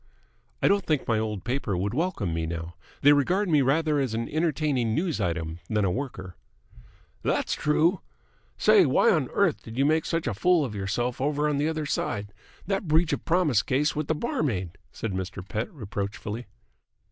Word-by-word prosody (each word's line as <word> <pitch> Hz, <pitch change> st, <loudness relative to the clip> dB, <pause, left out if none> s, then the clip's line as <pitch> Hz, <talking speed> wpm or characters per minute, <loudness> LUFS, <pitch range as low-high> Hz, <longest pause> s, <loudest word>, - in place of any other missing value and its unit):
"I -, -, +6 dB
don't 200 Hz, -1 st, +3 dB
think 155 Hz, -5 st, 0 dB
my 115 Hz, -2 st, +2 dB
old 105 Hz, -4 st, -3 dB
paper 120 Hz, -7 st, -1 dB
would 100 Hz, +4 st, -1 dB
welcome 145 Hz, -, -1 dB
me 80 Hz, 0 st, -2 dB
now. 85 Hz, +1 st, -5 dB, 0.3 s
They 145 Hz, +1 st, +8 dB
regard 180 Hz, +8 st, +2 dB
me 150 Hz, -3 st, +4 dB
rather 150 Hz, +3 st, +2 dB
as 130 Hz, -5 st, -1 dB
an 115 Hz, +1 st, -2 dB
entertaining 150 Hz, -7 st, 0 dB
news 165 Hz, -, -1 dB
item 85 Hz, -2 st, -2 dB
than 105 Hz, -2 st, +1 dB
a 90 Hz, -, +1 dB
worker." 95 Hz, -7 st, -5 dB, 0.9 s
"That's -, -, 0 dB
true. 160 Hz, +5 st, +2 dB, 0.6 s
Say, -, -, +5 dB
why -, -, +4 dB
on -, -, +1 dB
earth -, -, +1 dB
did 115 Hz, +2 st, -10 dB
you 135 Hz, -, +3 dB
make 155 Hz, +1 st, +2 dB
such 165 Hz, -1 st, -1 dB
a 120 Hz, -, -1 dB
fool 170 Hz, -, +3 dB
of 115 Hz, -, -5 dB
yourself 105 Hz, +5 st, -2 dB
over 145 Hz, +1 st, +1 dB
on 150 Hz, -1 st, 0 dB
the 150 Hz, +2 st, +1 dB
other 155 Hz, -1 st, -2 dB
side? 100 Hz, -7 st, -2 dB, 0.3 s
That 195 Hz, 0 st, -2 dB
breach 160 Hz, +2 st, +3 dB
of -, -, -3 dB
promise 160 Hz, -, +3 dB
case 140 Hz, +6 st, 0 dB
with 150 Hz, -1 st, -2 dB
the 160 Hz, -, +1 dB
barmaid!" 130 Hz, -, -2 dB, 0.2 s
said 115 Hz, -, -4 dB
Mr. 95 Hz, 0 st, -5 dB
Pett 105 Hz, +3 st, -3 dB
reproachfully. 105 Hz, -, -5 dB
130 Hz, 185 wpm, -26 LUFS, 100-155 Hz, 0.9 s, They